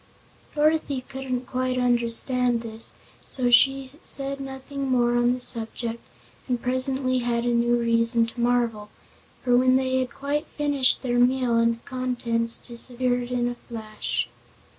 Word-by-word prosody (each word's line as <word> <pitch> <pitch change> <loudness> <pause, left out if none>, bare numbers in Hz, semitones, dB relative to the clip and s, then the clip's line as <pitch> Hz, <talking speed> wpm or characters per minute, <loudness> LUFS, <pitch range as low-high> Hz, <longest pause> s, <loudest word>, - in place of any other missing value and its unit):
Dorothy 300 -3 +1
couldn't 265 -2 -4
quite 255 0 -2
understand 245 0 +1
this, 225 -1 +2 0.3
so 245 -2 -1
she 270 +1 +4
said 275 0 -4
nothing 270 0 -5
more 240 -1 +2
on 240 0 +3
the 250 - -4
subject 230 -1 -1 0.5
and 250 -2 -1
presently 255 +1 0
had 235 -1 -1
a - - +1
new 240 0 +2
reason 230 0 +3
to 230 +2 -10
marvel. 235 -3 0 0.5
For 245 -1 +3
when 255 +1 +4
they 260 0 +1
had 255 -1 -2
quite 290 +3 -3
finished 285 -3 +2
their 245 -1 0
meal 250 0 +3
table - - +3
and 230 0 0
contents 240 -3 -1
disappeared 245 0 -1
in 245 -1 0
a 245 - -2
flash. 220 -3 -4
245 Hz, 145 wpm, -25 LUFS, 235-260 Hz, 0.5 s, she